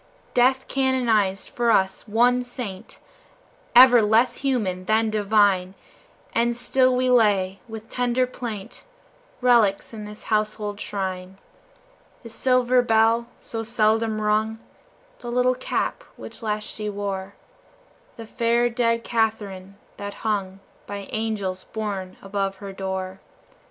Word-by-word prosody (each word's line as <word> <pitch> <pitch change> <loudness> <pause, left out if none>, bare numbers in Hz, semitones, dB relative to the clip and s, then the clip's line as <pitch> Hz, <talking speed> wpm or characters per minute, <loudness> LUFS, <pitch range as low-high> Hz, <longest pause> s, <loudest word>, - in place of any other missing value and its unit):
Death 260 +2 +3
canonized 235 -8 +1
for 240 -1 0
us 190 -1 +1
one 245 +3 +3
saint, 240 -6 -8 0.8
Ever 245 -1 +9
less 230 +3 +3
human 215 -10 -1
than 220 +2 +2
divine, 200 -3 +2 0.6
And 235 +1 +1
still 255 +1 +2
we 255 0 +1
lay, 200 -5 +3
with 220 -1 -9
tender 250 0 0
plaint, 230 -5 -7 0.6
Relics 235 -5 +3
in 215 -1 -7
this 210 0 -10
household 215 -1 -1
shrine 190 -2 -5 0.9
The 230 - -9
silver 255 +1 +2
bell, 225 0 +3
so 225 - -5
seldom 220 0 +1
rung, 215 +1 0 0.6
The 240 - -6
little 250 +1 +3
cap 255 - -2
which - - -11
last 215 -1 -2
she 210 -1 -5
wore, 200 -1 -4 0.8
The 230 - -8
fair, 235 +2 +1
dead 230 -1 +1
Catherine 205 -5 -2 0.2
that 200 0 -6
hung 195 -3 -2 0.3
By 200 -1 -6
angels 205 -4 -3
borne 200 -4 -5
above 195 0 -2
her 195 0 -9
door. 190 0 -4
220 Hz, 120 wpm, -23 LUFS, 200-240 Hz, 0.9 s, Ever